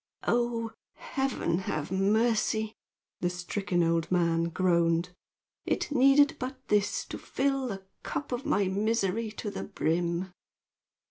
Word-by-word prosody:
"Oh, 235 Hz, -1 st, +1 dB, 0.2 s
Heaven 265 Hz, -, -1 dB
have 155 Hz, -4 st, -3 dB
mercy!" 220 Hz, +2 st, +2 dB, 0.5 s
the 175 Hz, -, +1 dB
stricken 180 Hz, 0 st, -1 dB
old 165 Hz, 0 st, +1 dB
man 170 Hz, -2 st, +2 dB
groaned. 170 Hz, 0 st, +2 dB, 0.5 s
"It -, -, -1 dB
needed 280 Hz, +1 st, +5 dB
but 260 Hz, +1 st, -4 dB
this 210 Hz, -1 st, +2 dB
to -, -, -7 dB
fill 270 Hz, -1 st, 0 dB
the 195 Hz, -4 st, -5 dB, 0.2 s
cup 285 Hz, -, -4 dB
of 245 Hz, +1 st, -2 dB
my 245 Hz, -11 st, +2 dB
misery 215 Hz, +2 st, 0 dB
to 210 Hz, -1 st, -4 dB
the -, -, -5 dB
brim!" 175 Hz, 0 st, -1 dB
200 Hz, 125 wpm, -29 LUFS, 175-240 Hz, 0.5 s, needed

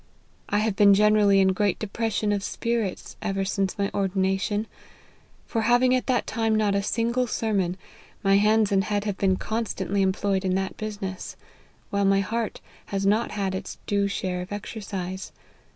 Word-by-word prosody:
I 205 Hz, -, +1 dB
have 215 Hz, -1 st, +1 dB
been 200 Hz, -1 st, +6 dB
generally 210 Hz, -1 st, +5 dB
in 190 Hz, -1 st, +5 dB
great 195 Hz, 0 st, +1 dB
depression 215 Hz, 0 st, -1 dB
of 200 Hz, -1 st, -1 dB
spirits 230 Hz, -3 st, -3 dB
ever 195 Hz, -2 st, -1 dB
since 195 Hz, -1 st, -1 dB
my 200 Hz, -1 st, -1 dB
ordina 190 Hz, 0 st, 0 dB
tion; 210 Hz, +1 st, -1 dB, 0.8 s
for, 225 Hz, -, -1 dB
having 245 Hz, +3 st, +4 dB
at 255 Hz, -, 0 dB
that 250 Hz, -2 st, +1 dB
time 225 Hz, -1 st, 0 dB
not 210 Hz, -2 st, +2 dB
a 200 Hz, -, +1 dB
single 235 Hz, +4 st, 0 dB
sermon, 195 Hz, -6 st, -1 dB, 0.5 s
my 195 Hz, 0 st, +5 dB
hands 215 Hz, 0 st, +3 dB
and 195 Hz, 0 st, +2 dB
head 205 Hz, -1 st, -1 dB
have 205 Hz, -3 st, -3 dB
been 190 Hz, -1 st, +3 dB
constantly 200 Hz, -3 st, -2 dB
employed 190 Hz, 0 st, +1 dB
in 185 Hz, -1 st, +1 dB
that 190 Hz, 0 st, -2 dB
business, 200 Hz, -3 st, -5 dB, 0.6 s
while 200 Hz, 0 st, +1 dB
my 195 Hz, 0 st, +4 dB
heart 225 Hz, +3 st, -3 dB, 0.3 s
has 195 Hz, -1 st, -2 dB
not 215 Hz, +4 st, +2 dB
had 195 Hz, -2 st, -1 dB
its 190 Hz, -, -5 dB
due 200 Hz, -1 st, +1 dB
share 185 Hz, -2 st, -2 dB
of 180 Hz, -, -8 dB
exercise. 195 Hz, -3 st, -5 dB
200 Hz, 170 wpm, -25 LUFS, 195-215 Hz, 0.8 s, been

